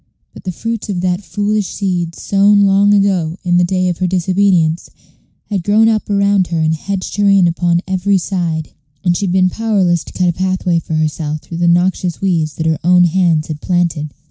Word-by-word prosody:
But - - -13
the 185 - -2
fruits 225 +4 -5
of 180 -3 -2
that 180 +1 -1
foolish 205 0 -2
seed, 175 -4 -2
sown 200 +1 +3
long 200 +1 +3
ago, 190 -5 +1
in 175 -1 +1
the 180 - +4
day 185 +1 0
of 175 -2 -2
her 185 - 0
disobedience, 180 -2 +1 0.6
had 195 -4 -1
grown 215 +4 +3
up 220 -2 0
around 200 -2 +2
her 170 - -3
and 160 0 +1
hedged 190 +5 -4
her 205 -1 +3
in 195 -3 +4
upon 170 0 0
every 190 +1 +1
side, 170 -4 -3 0.3
and 175 -2 +2
she 200 - -1
had - - -1
been 185 0 +2
powerless 195 -7 0
to - - -12
cut 180 - 0
a - - 0
pathway 185 -1 0
for 160 - -5
herself 155 -1 -2
through 165 - -8
the 170 0 +1
noxious 175 0 +1
weeds 165 -6 -1
that 160 - -4
her 160 -1 0
own 180 +1 +5
hands 170 -3 +2
had 155 -2 -7
planted. 170 -4 -1
180 Hz, 205 wpm, -15 LUFS, 170-195 Hz, 0.6 s, own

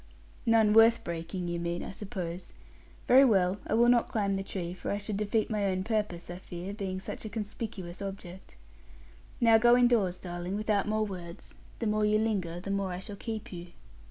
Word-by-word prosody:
'None 220 -2 +5
worth 225 +1 +6
breaking, 170 +2 -4
you 170 0 -2
mean, 170 0 -3
I - - -6
suppose. 185 -3 -6 0.5
Very 260 +2 +8
well; 195 -5 +3
I - - +1
will 235 +1 +5
not 240 -1 +4
climb 200 -3 0
the 195 - -1
tree, 180 -3 -5
for 185 - -6
I 200 - 0
should 205 0 -4
defeat 210 +2 0
my 210 -2 0
own 185 -1 0
purpose, 210 -6 -2
I 175 - -6
fear; 180 +1 -7
being 190 -3 -4
such - - -6
a 215 - -5
conspicuous 205 -3 -6
object. 190 - -8 0.8
Now 230 -2 +6
go 240 +2 +6
indoors, 230 -7 +3
darling, 175 +1 -5
without 210 -2 0
more 215 0 +1
words. 175 -4 -8 0.2
The 230 - -3
more 215 0 +1
you 210 0 +3
linger, 195 -6 -1
the 195 +2 -5
more 200 -1 -1
I 180 - -4
shall 205 +1 -8
keep 220 -1 -6
you.' 175 0 -7
200 Hz, 195 wpm, -30 LUFS, 180-215 Hz, 0.8 s, Very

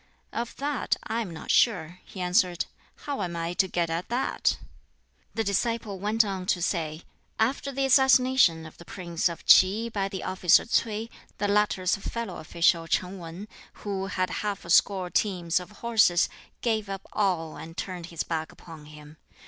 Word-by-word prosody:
"Of 235 0 -4
that 285 -2 -1
I 225 +2 -2
am 215 - -4
not 165 -2 -5
sure," 180 -6 +2
he 190 - -9
answered; 180 -1 +2 0.4
"how 285 -6 -3
am 175 -3 -3
I 170 +1 -2
to 190 +1 +2
get 175 -2 0
at 165 +2 -3
that?" 245 +3 0 0.8
The 225 - 0
disciple 215 0 -1
went 215 +3 +2
on 190 -2 -4
to 180 - +2
say: 165 -2 -2 0.4
"After 270 +5 0
the 275 0 0
assassination 260 - +4
of 155 - -13
the - - -10
prince 170 -2 -2
of 170 - -9
Ts'i 210 +5 +6
by 195 -3 -2
the 190 -1 -5
officer 185 -2 +4
Ts'ui, 225 -1 -1 0.3
the 205 - 0
latter's 205 -2 +2
fellow 230 +3 -5
official 165 +1 +1
Ch'in 185 +3 -1
Wan, 170 +4 -8 0.4
who 195 -1 -2
had 185 -1 -1
half 205 -4 -3
a 170 - -4
score 185 -1 +3
teams 180 -5 +1
of 180 - -10
horses, 215 -5 +2 0.3
gave 220 -4 0
up 195 -1 -6
all, 175 -6 0
and 165 +1 -10
turned 180 -3 -5
his 170 -2 -4
back 160 -1 -3
upon 160 -3 -13
him. 150 0 -13
190 Hz, 175 wpm, -27 LUFS, 170-220 Hz, 0.8 s, Ts'i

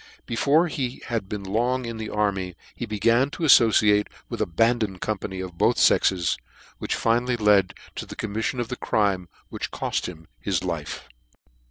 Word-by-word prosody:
Before 145 +8 +3
he 130 -5 -4
had 115 -5 -2
been 105 -1 -4
long 120 +6 0
in 115 -1 -5
the 110 -1 -5
army 95 -4 -1 0.2
he 120 - -5
began 115 +5 +2
to 165 - -6
aflbciate 105 -7 +5 0.2
with - - -4
abandoned 110 +1 +1
company 95 -2 -3
of 90 -2 -8
both - - +3
fexes, 90 -4 +3 0.4
which - - -2
finally 120 +2 +1
led 105 -3 +3 0.2
to - - -5
the - - -8
commifiion 110 +4 -2
of 120 -1 -2
the 125 - -3
crime 95 -4 0 0.2
which - - -5
coft - - -2
him 80 -3 -10
his 95 -4 -1
life. 85 -5 -4
105 Hz, 165 wpm, -25 LUFS, 95-120 Hz, 0.4 s, aflbciate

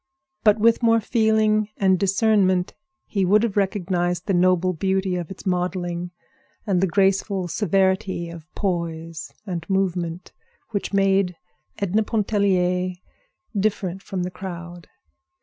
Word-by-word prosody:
But 210 -1 +5
with 230 +2 +3
more 230 -1 +4
feeling 220 -1 +2
and 190 -2 +3
discernment 195 -2 +2 0.3
he 200 -2 -1
would 205 +4 +4
have 230 -4 -1
recognized 180 -3 0
the 195 - 0
noble 185 0 +3
beauty 190 +2 0
of 175 -3 -4
its 190 - -10
modeling, 180 -1 -2 0.6
and 190 -4 +1
the 190 - +3
graceful 195 0 +1
severity 190 +1 0
of 170 0 -11
poise 165 -4 -3
and 175 -5 -4
movement, 180 -3 -1 0.4
which 200 -2 -2
made 195 -2 +2 0.4
Edna 200 +2 +1
Pontellier 190 -4 +1 0.6
different 195 -2 -1
from 190 -2 -4
the 180 - -4
crowd. 175 -2 -8
190 Hz, 125 wpm, -23 LUFS, 180-200 Hz, 0.6 s, But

